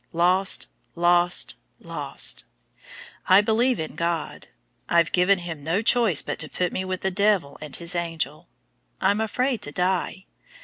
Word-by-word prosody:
Lost! 180 +3 +3 0.3
Lost! 175 +1 +2 0.3
Lost! - - +1 0.8
I 185 +1 +7
believe 230 +4 +1
in 155 - -5
God. 170 0 -3 0.4
I've 170 -1 +3
given 185 +2 +3
Him 165 -5 -7
no 170 +8 -1
choice 225 - +3
but - - -5
to 155 - -3
put 180 -1 -2
me 185 - -2
with 185 -1 -4
'the 190 - -1
devil 200 -7 +1
and 150 -3 -6
his 170 0 -4
angel.' 165 -4 -4 0.5
I'm 200 +3 +1
afraid 250 +3 -1
to 145 - -5
die. 185 +3 -2
180 Hz, 145 wpm, -24 LUFS, 170-200 Hz, 0.8 s, I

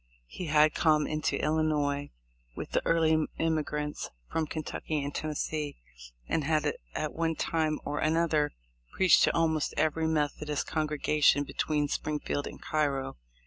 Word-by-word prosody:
He 175 - -7
had 150 0 +5
come 155 -2 +3
into 155 0 -1
Illinois 150 -2 0 0.5
with - - -6
the - - +2
early 160 -1 +3
immigrants 150 -2 -1 0.2
from 160 -1 0
Kentucky 155 -1 -3
and 145 0 -4
Tennessee, 150 -1 -3 0.5
and 155 - 0
had 155 +1 +1 0.2
at 155 - -2
one 165 0 0
time 155 -1 0
or 150 - -2
another 155 -1 +2 0.4
preached 190 -1 +5
to - - 0
almost 160 -2 +1
every 160 +1 +1
Methodist 150 -1 -1
con 155 -1 -1
gregation 150 -1 +3
between 150 0 0
Springfield 150 -1 -2
and - - -9
Cairo. 140 - -1
155 Hz, 140 wpm, -29 LUFS, 150-160 Hz, 0.5 s, had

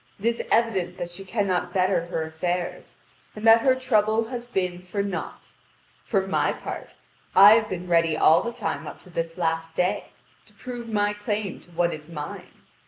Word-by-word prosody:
It 200 - -8
is 235 0 +1
evident 190 -6 +1
that 175 0 -5
she 175 +3 -8
cannot 190 -3 -1
better 185 -2 +2
her 165 -2 -2
affairs, 175 +3 -4 0.4
and 210 +1 -6
that 225 0 +8
her 260 +1 +4
trouble 225 -3 +1
has 245 -1 -5
been 180 -6 -2
for 185 +3 -3
naught. 195 -3 -5 0.5
For 195 -4 0
my 190 - +1
part, - - -7 0.4
I 200 +2 +10
have 220 -1 +2
been 180 -1 -5
ready 165 -2 +3
all 160 +1 +6
the 235 - -3
time 205 -10 -4
up 150 - -8
to 180 - -15
this 165 0 -3
last 165 -1 -1
day, 180 +1 0 0.4
to - - -19
prove 245 -2 -7
my 205 -1 +1
claim 205 -2 -3
to - - -20
what 170 0 +1
is 150 +1 -9
mine. 150 -3 -7
185 Hz, 185 wpm, -25 LUFS, 170-220 Hz, 0.5 s, I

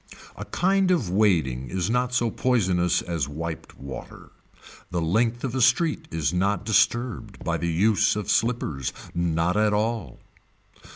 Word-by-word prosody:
A - - -7
kind 190 +1 +1
of 135 - +1
wading 80 - +1
is 90 +3 -1
not 125 +2 0
so 120 -2 +1
poisonous 95 -9 +1
as 85 -6 -2
wiped 80 +2 -6
water. 70 0 -9 0.6
The 90 - -2
length 115 +8 +1
of 130 -3 -2
a 130 - 0
street 150 +7 +2
is 80 0 -1
not 100 +2 0
disturbed 110 0 0
by 85 -1 0
the 85 0 -2
use 100 +6 +3
of 105 -3 -4
slippers. 100 - 0 0.2
Not 85 +1 0
at 105 0 +2
all. 105 - -2
100 Hz, 150 wpm, -25 LUFS, 85-120 Hz, 0.6 s, use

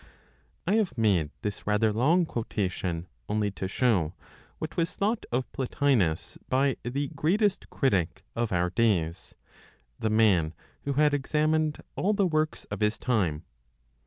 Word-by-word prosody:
I 200 +5 +3
have 210 - 0
made 95 -9 +2
this 105 -1 -4
rather 105 +1 +3
long 160 +11 +3
quotation 95 - -2 0.2
only 105 -1 +1
to 95 -1 -4
show 95 -6 +1 0.4
what - - -5
was 170 -1 0
thought 215 +3 0
of 125 +2 -1
Plotinos 125 - 0
by 135 0 +2
the 135 +4 -2
greatest 190 +7 +1
critic 95 - 0
of 115 -1 -1
our 90 -1 +1
days, 95 -5 0 0.6
the 110 - 0
man 95 -8 +3 0.3
who 140 - 0
had 150 +1 +3
examined 155 +2 +1
all 205 +3 +1
the 200 -2 +2
works 155 -2 0
of - - -3
his 105 +1 +1
time. 90 -11 0
115 Hz, 140 wpm, -28 LUFS, 95-150 Hz, 0.6 s, I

